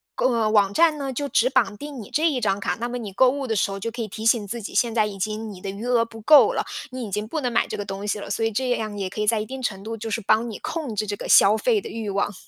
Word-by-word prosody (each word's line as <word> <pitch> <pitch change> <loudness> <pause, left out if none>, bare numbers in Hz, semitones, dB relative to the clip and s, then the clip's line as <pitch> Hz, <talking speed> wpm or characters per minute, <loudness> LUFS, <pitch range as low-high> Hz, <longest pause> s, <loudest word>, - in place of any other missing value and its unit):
购 255 - +2
呃， 225 -2 +1
网 200 -2 +3
站 325 +1 +4
呢， 275 -2 -4
就 285 +3 -3
只 240 - +3
绑 205 -6 +1
定 285 -2 -7
你 205 - -11
这 315 +2 +2
一 265 -5 -2
张 200 -2 +1
卡， - - -1
那 240 +1 -2
么 245 - -4
你 215 -5 -7
购 255 +6 +5
物 275 +1 -3
的 225 - -1
时 200 - +1
候 195 - -5
就 230 +4 -3
可 235 +1 -5
以 220 - -3
提 215 +2 -7
醒 230 -3 +3
自 235 +3 -5
己， - - -7
现 235 -2 +2
在 215 -2 +3
已 200 -2 -6
经 215 +2 -3
你 185 - -12
的 195 - -5
余 200 +4 -6
额 245 -2 +3
不 225 -1 -12
够 295 +6 +7
了， - - -1 0.3
你 255 -1 -5
已 200 - -9
经 210 +2 -2
不 315 - -3
能 250 -4 -2
买 230 - +2
这 - - -5
个 205 - -4
东 195 +1 -6
西 210 - 0
了， - - -7
所 215 +3 -1
以 225 - +1
这 255 +4 -1
样 215 -3 -2
也 195 -2 -3
可 215 - -4
以 210 - -1
在 225 0 +3
一 210 - -3
定 260 +3 -7
程 195 -5 -3
度 225 +2 -5
就 225 0 -6
是 220 - -1
帮 220 +3 +2
你 215 - -6
控 310 -7 -4
制 215 +1 -1
这 205 - -3
个 - - -7
消 205 +2 +7
费 445 - +2
的 - - -8
欲 225 -2 -5
望。 200 +1 -1
225 Hz, 365 characters per minute, -23 LUFS, 205-250 Hz, 0.3 s, 够